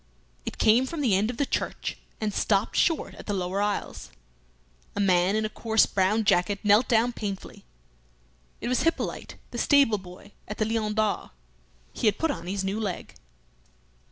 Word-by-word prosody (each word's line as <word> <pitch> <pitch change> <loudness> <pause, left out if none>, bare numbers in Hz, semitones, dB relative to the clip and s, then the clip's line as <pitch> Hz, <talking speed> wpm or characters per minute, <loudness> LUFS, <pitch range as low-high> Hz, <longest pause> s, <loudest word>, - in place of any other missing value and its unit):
It - - -4
came 235 +4 +4
from 320 +2 -4
the 245 -8 +2
end 205 +4 +1
of 245 - -5
the 285 - +1
church, - - -3 0.2
and 215 -2 -2
stopped 200 +1 +1
short 330 -2 +1
at - - -12
the 205 - -1
lower 185 +1 -1
aisles. 205 0 -3 0.9
A - - -3
man 185 0 +3
in 215 0 +1
a - - +1
coarse 220 0 +2
brown 200 +3 +1
jacket 200 -1 +2
knelt 210 +3 +5
down 240 0 +3
painfully. 200 -4 -6 1.0
It - - -3
was 250 +1 +1
Hippolyte, 330 +1 -2 0.2
the 240 - -4
stable 275 -8 +4
boy 185 +2 -13 0.2
at 210 - -6
the 215 - +1
"Lion 215 -1 -1
d'Or." 215 -1 0 0.6
He 230 - 0
had 210 - +3
put 325 -1 +1
on 170 0 -6
his 195 +1 -2
new 195 +3 -2
leg. 200 -5 -4
210 Hz, 180 wpm, -26 LUFS, 195-230 Hz, 1.0 s, knelt